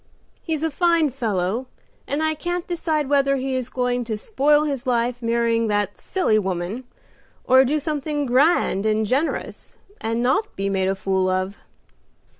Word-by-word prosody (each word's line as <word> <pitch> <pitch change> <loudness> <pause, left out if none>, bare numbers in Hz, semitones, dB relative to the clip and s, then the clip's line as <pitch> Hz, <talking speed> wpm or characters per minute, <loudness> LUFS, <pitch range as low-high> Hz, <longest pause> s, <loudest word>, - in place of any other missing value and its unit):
He 325 - -3
is 305 - -4
a 320 - 0
fine 335 -1 +2
fellow, 225 -1 -2 0.4
and 295 +3 -1
I 315 0 +1
can't 350 +3 -3
decide 320 -4 -1
whether 275 -1 +3
he 265 0 -2
is 255 -1 -3
going 250 -1 -1
to 220 -2 -3
spoil 295 - +2
his 275 -3 -3
life 245 0 0
marrying 230 -1 +1
that 205 -1 -1
silly 225 - +1
woman, 190 +5 -3 0.6
or 260 +1 +6
do 285 +4 +1
something 295 -1 -2
grand 255 - +3
and 215 0 +1
generous, 270 +9 -2 0.2
and 230 +2 -1
not 265 - 0
be 195 0 -2
made 190 -1 0
a 195 - +1
fool 190 -1 0
of." 185 +2 -2
255 Hz, 165 wpm, -22 LUFS, 215-295 Hz, 0.6 s, or